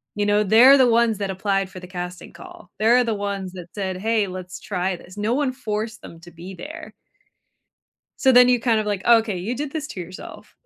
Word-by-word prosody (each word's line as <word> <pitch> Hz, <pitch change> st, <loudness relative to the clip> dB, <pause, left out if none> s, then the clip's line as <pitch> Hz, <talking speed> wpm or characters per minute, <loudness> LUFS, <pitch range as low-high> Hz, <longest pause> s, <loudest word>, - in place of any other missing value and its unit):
you 205 Hz, -, -1 dB
know? 205 Hz, +1 st, +2 dB
They're 240 Hz, +7 st, +7 dB
the 260 Hz, -2 st, +5 dB
ones 230 Hz, -2 st, +2 dB
that 200 Hz, -1 st, -3 dB
applied 195 Hz, 0 st, -1 dB
for 185 Hz, -, -10 dB
the 180 Hz, -, -11 dB
casting 180 Hz, 0 st, -7 dB
call. 355 Hz, -2 st, -14 dB
They're 235 Hz, +3 st, +4 dB
the 225 Hz, -2 st, -1 dB
ones 200 Hz, -2 st, -4 dB
that 180 Hz, -2 st, -9 dB
said, 190 Hz, -3 st, -4 dB
"Hey, 215 Hz, +1 st, 0 dB
let's 185 Hz, -1 st, -8 dB
try 185 Hz, -1 st, -2 dB
this." 185 Hz, +4 st, -15 dB
No 210 Hz, +3 st, -1 dB
one 270 Hz, -1 st, 0 dB
forced 220 Hz, -3 st, -4 dB
them 165 Hz, -, -12 dB
to 175 Hz, 0 st, -14 dB
be 175 Hz, +4 st, -10 dB
there. 300 Hz, -, -10 dB, 1.3 s
So 265 Hz, -1 st, +4 dB
then 250 Hz, 0 st, +7 dB
you 245 Hz, -2 st, +3 dB
kind 230 Hz, -3 st, +2 dB
of 215 Hz, -, -4 dB
like, 205 Hz, -2 st, -3 dB
"Okay. 225 Hz, -4 st, +3 dB
You 200 Hz, +8 st, -3 dB
did 285 Hz, 0 st, -5 dB
this 310 Hz, -2 st, -4 dB
to 185 Hz, -, -7 dB
yourself." 180 Hz, +1 st, -11 dB
210 Hz, 220 wpm, -22 LUFS, 185-235 Hz, 1.3 s, They're